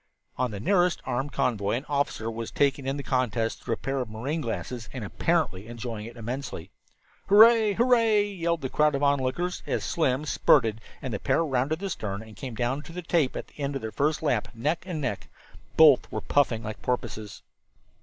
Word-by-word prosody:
On 130 0 0
the 105 -3 -6
nearest 180 - +2
armed 130 +3 -2
convoy 105 -7 0
an 130 +5 -2
officer 140 -6 -1
was 115 0 -5
taking 140 -1 +1
in 135 +1 -1
the 140 - -5
contest 120 -4 -1
through 115 - -1
a - - -21
pair 135 0 -2
of 125 -4 -3
marine 135 +9 -3
glasses, 115 -1 -4
and 125 -4 -6
apparently 110 - 0
enjoying 115 -2 -6
it 120 +1 -11
immensely. 115 -6 -5 0.6
"Hooray! 220 +1 +7
Hooray!" 230 -2 +4
yelled 170 -5 -2
the 130 - -3
crowd 150 +1 +2
of 140 - -2
onlookers 140 +6 0
as - - -1
Slim 145 -3 0
spurted 115 -6 +3 0.2
and 130 -3 -3
the 100 - -2
pair 165 - +1
rounded 135 +2 0
the 195 +3 -4
stern 105 - -4
and 110 -1 -13
came 125 +2 -7
down 125 +5 -1
to 165 - -12
the 180 +1 -6
tape 160 -5 +1
at - - -4
the - - -22
end 140 0 -2
of 135 - -4
their 110 - -4
first 150 +5 0
lap, 125 -8 +1
neck 150 +9 -1
and 165 -5 -3
neck. 125 -7 -3 0.5
Both 150 -5 +6
were - - -3
puffing 120 -6 +1
like 110 0 -6
porpoises. 110 -4 -4
135 Hz, 200 wpm, -27 LUFS, 115-160 Hz, 0.6 s, Hooray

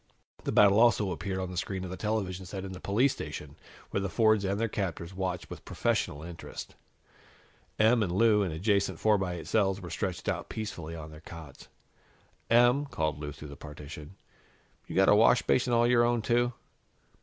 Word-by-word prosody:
The - - 0
battle 100 0 +6
also 105 -4 +4
appeared 90 +3 -3
on 95 -1 -3
the 90 - -6
screen 95 +1 -3
of 90 - -6
the - - -4
television 95 -2 -2
set 95 +1 -6
in 95 - -6
the 90 - -8
police 115 +9 +2
station, - - -7 0.4
where 100 - 0
the 100 - -2
Fords 110 -1 +3
and 100 +1 -1
their 115 - +1
captors 95 -4 -4
watched 95 -2 -3
with - - -8
professional 70 +2 -1
interest. 85 0 -8 1.0
Em 110 +2 +4
and 95 -5 0
Lou, 105 +2 +4
in 95 -4 -1
adjacent 95 +1 0
four 105 -2 +3
by 90 -2 -2
eight 80 -3 -7
cells, 95 -1 +1
were 90 -4 -8
stretched 90 +1 -3
out - - -2
peacefully 85 -7 -5
on 80 -1 -8
their 75 0 -12
cots. 80 -4 -11 0.8
"Em," 120 +5 +4
called 80 - -2
Lou 75 -1 -5
through 75 +1 -10
the 70 - -9
partition, 75 +3 -10 0.7
"you - - -7
got 95 0 +5
a - - +7
washbasin 120 +3 +4
all 120 0 +4
your 120 0 +4
own, 120 -1 +1
too?" 120 +1 +2
95 Hz, 190 wpm, -29 LUFS, 85-110 Hz, 1.0 s, a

